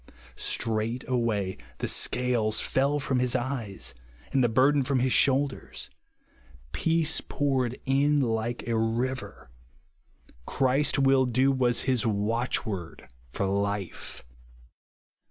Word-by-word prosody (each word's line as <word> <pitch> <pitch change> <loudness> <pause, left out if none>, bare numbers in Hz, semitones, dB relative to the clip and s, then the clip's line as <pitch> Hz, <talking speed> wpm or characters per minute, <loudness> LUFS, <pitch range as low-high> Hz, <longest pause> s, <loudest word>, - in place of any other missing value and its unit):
Straightway 115 -3 -1 0.2
the - - -2
scales 120 -4 0
fell 140 +2 +1
from 135 -2 0
his 125 0 +1
eyes, 120 - -3 0.4
and 135 -2 +3
the 120 - +3
burden 135 +5 +4
from 135 0 0
his 130 0 +2
shoulders. 140 0 +1 0.8
Peace 165 - +1
poured 130 -4 0
in 145 +2 +3
like 115 -2 -1
a 115 - 0
river. 115 - -2 0.8
''• - - -27
Christ 135 +2 +2
mil 135 -1 +4
do," 130 +3 +3
was 125 -3 +1
his 130 -4 +1
watchword 105 - -2 0.2
for 100 - -2
life. 100 -5 -3
125 Hz, 110 wpm, -27 LUFS, 110-135 Hz, 0.8 s, burden